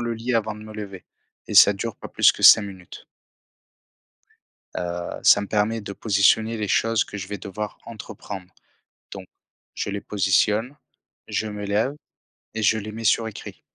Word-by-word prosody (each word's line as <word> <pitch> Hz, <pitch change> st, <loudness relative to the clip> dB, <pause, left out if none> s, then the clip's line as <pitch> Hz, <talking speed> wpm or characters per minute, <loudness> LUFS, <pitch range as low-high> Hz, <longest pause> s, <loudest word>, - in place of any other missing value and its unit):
le 120 Hz, -1 st, -2 dB
lit, 115 Hz, +2 st, -3 dB
avant 110 Hz, -1 st, -1 dB
de 105 Hz, -, -11 dB
me 110 Hz, -, -10 dB
lever. 100 Hz, -3 st, -8 dB, 0.4 s
Et -, -, -6 dB
ça 100 Hz, -, +8 dB
dure 105 Hz, +2 st, -5 dB
pas -, -, -10 dB
plus -, -, +4 dB
que -, -, -10 dB
5 110 Hz, -, +9 dB
minutes 95 Hz, -3 st, -11 dB, 1.7 s
heu, 85 Hz, 0 st, -5 dB
ça -, -, +6 dB
me 100 Hz, -, -5 dB
permet 110 Hz, +2 st, 0 dB
de 100 Hz, -1 st, -7 dB
positionner 110 Hz, +2 st, +2 dB
les 105 Hz, -2 st, -3 dB
choses 115 Hz, +2 st, +2 dB
que 105 Hz, -, -9 dB
je 95 Hz, -1 st, -7 dB
vais 105 Hz, -1 st, -5 dB
devoir 105 Hz, +2 st, -6 dB
entreprendre. 100 Hz, -4 st, -9 dB, 0.6 s
Donc, -, -, -8 dB, 0.5 s
je -, -, -3 dB
les 100 Hz, 0 st, -4 dB
positionne, 105 Hz, +5 st, +1 dB, 0.5 s
je 110 Hz, -, -2 dB
me 105 Hz, -1 st, -6 dB
lève 110 Hz, +8 st, 0 dB, 0.6 s
et 110 Hz, -, -3 dB
je 110 Hz, +2 st, +3 dB
les 105 Hz, 0 st, -7 dB
mets 115 Hz, +1 st, -8 dB
sur 110 Hz, +1 st, +2 dB
écrit. 110 Hz, -, -10 dB
105 Hz, 175 wpm, -23 LUFS, 100-110 Hz, 1.7 s, 5